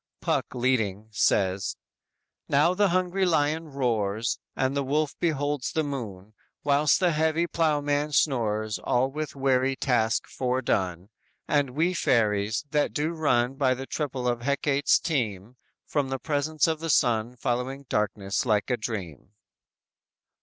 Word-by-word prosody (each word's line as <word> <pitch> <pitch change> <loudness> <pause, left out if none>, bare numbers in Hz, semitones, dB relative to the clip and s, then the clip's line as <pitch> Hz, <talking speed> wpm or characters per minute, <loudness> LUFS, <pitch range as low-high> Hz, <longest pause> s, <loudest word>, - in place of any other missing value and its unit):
Puck - - -1
leading, 110 -5 0
says: 95 -2 +1 0.7
_"Now 150 +5 +4
the 200 +1 +2
hungry 185 +2 0
lion 160 -2 +1
roars, 115 -5 -1 0.2
And 130 +1 0
the 140 - +1
wolf 145 +2 0
beholds 145 -4 -1
the 160 - 0
moon. 110 -8 -6 0.3
Whilst 145 +1 +3
the 180 -3 +3
heavy 160 +2 +1
ploughman 150 -3 0
snores 110 -7 +1
All 130 +2 +1
with 155 +1 -5
weary 135 -1 +1
task 120 -4 +1
foredone; 105 -8 -1 0.4
And 140 -3 +1
we 170 +4 +2
fairies, 110 - +1
that 150 -1 +1
do 155 +2 0
run 135 -6 +1
By 130 -2 +2
the 135 +1 -6
triple 135 -4 -3
of 120 -1 0
Hecate's 140 +1 +2
team, 115 - -3 0.3
From 140 -3 -1
the 135 - -2
presence 150 +2 0
of 160 -1 -1
the 165 0 -4
sun 120 -3 +2
Following 125 +3 -3
darkness 100 -2 -1
like 105 -1 +1
a 125 - +1
dream." 95 - -6
135 Hz, 140 wpm, -26 LUFS, 110-150 Hz, 0.7 s, Now